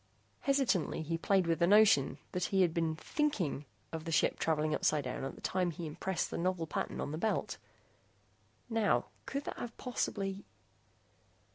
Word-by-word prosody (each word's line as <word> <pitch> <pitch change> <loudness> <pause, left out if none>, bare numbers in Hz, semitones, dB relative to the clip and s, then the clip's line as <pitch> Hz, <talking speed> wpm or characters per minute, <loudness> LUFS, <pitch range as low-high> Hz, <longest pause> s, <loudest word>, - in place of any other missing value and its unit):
Hesitantly, 250 - +1
he 165 +2 -1
played 190 +2 +2
with 165 0 +1
the 170 - +4
notion 205 -9 +5
that 180 0 -1
he 190 -1 +3
had 170 -3 +2
been 165 -2 0
thinking 175 - -1 0.3
of 160 -1 -4
the 165 - -3
ship - - +2
traveling 155 -1 +1
upsidedown 140 -6 0
at 135 - -4
the - - -14
time 185 -1 0
he 170 +1 -5
impressed 175 +4 -2
the - - -3
novel 180 -1 0
pattern 155 - -3
on - - -3
the 155 - -3
belt. 220 +4 -1 1.1
Now, 215 - +1 0.2
could 280 +1 -2
that - - -6
have 235 -1 -6
possibly 195 -5 -2
175 Hz, 165 wpm, -33 LUFS, 155-200 Hz, 1.1 s, notion